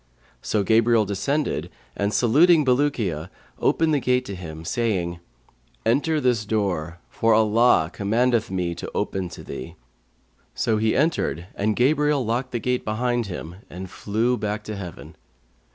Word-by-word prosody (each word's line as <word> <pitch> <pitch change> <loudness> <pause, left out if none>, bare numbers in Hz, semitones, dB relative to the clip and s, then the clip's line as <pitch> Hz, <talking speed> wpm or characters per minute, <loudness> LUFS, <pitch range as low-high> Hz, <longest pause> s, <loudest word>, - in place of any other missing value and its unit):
So 105 -2 0
Gabriel 115 +1 +4
descended 140 +10 -1 0.3
and, 100 0 0
saluting 145 - +4
Bulukiya, 125 - 0 0.3
opened 160 -1 +2
the 145 - +3
gate 125 0 +1
to 100 - -6
him, 80 -3 -8
saying, 95 -8 -1 0.7
'Enter 145 +7 +2
this 125 -6 +1
door, 95 -6 -1
for 115 -1 +2
Allah 110 -5 +4
commandeth 115 +3 +1
me 90 -2 -1
to 85 - -7
open 95 -2 -2
to - - -10
thee.' 65 - -7 0.8
So 110 - +1
he 110 +1 +1
entered 140 - 0
and 105 +1 0
Gabriel 145 +1 +2
locked 120 +4 -1
the 120 - -1
gate 125 +1 -1
behind 120 +1 -1
him 85 -2 -7
and 95 +1 -8
flew 115 +4 0
back 105 0 -3
to 105 0 -6
heaven. 90 -4 -9
110 Hz, 145 wpm, -23 LUFS, 95-125 Hz, 0.8 s, Gabriel